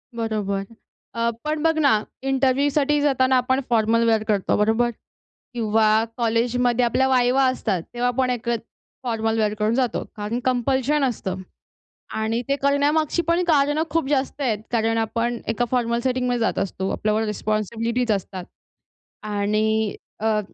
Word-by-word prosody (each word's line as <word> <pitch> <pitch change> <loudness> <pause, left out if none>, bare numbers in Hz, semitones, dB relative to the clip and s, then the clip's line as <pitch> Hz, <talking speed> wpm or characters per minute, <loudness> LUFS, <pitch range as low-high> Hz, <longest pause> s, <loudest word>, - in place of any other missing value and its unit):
बरोबर. 210 -4 -2 0.5
अ, 230 0 0
पण 305 0 -2
बघ 325 -1 +2
ना 265 -8 +3 0.2
इंटरव्ह्यूसाठी 275 +2 +2
जाताना 260 -2 +3
आपण 260 +1 +1
फॉर्मल 230 0 +3
वेअर 220 -1 +2
करतो, 205 -3 +1
बरोबर? 225 +3 +2 0.6
किंवा 220 -1 +3
कॉलेजमध्ये 240 +1 +1
आपल्या 260 +3 +2
वायवा 255 +1 +3
असतात. 190 -8 -2
तेव्हा 245 +1 0
आपण 250 +1 0
एक 240 -1 -3 0.5
फॉर्मल 225 -2 -1
वेअर 210 -1 +1
करून 215 +1 +1
जातो. 250 -2 0
कारण 210 +3 -3
कंपल्शन 260 +3 +1
असतं. 190 -7 -2 0.7
आणि 220 +2 -1
ते 280 - +2
करण्यामागची 290 +4 +2
पण 335 +2 +1
कारणं 295 -1 +3
खूप 325 -3 0
जास्त 280 0 -1
आहेत. 230 -6 0
कारण 225 -1 +1
आपण 230 +1 -1
एका 225 +2 +1
फॉर्मल 235 -2 +1
सेटिंगमध्ये 250 -1 0
जात 225 - 0
असतो. 190 0 -2
आपल्यावर 215 +1 0
रिस्पॉन्सिबिलिटीज 220 +3 -1
असतात. 190 -2 -4 0.8
आणि 215 +1 0 0.2
अ, 215 0 +1
235 Hz, 135 wpm, -23 LUFS, 220-265 Hz, 0.8 s, ना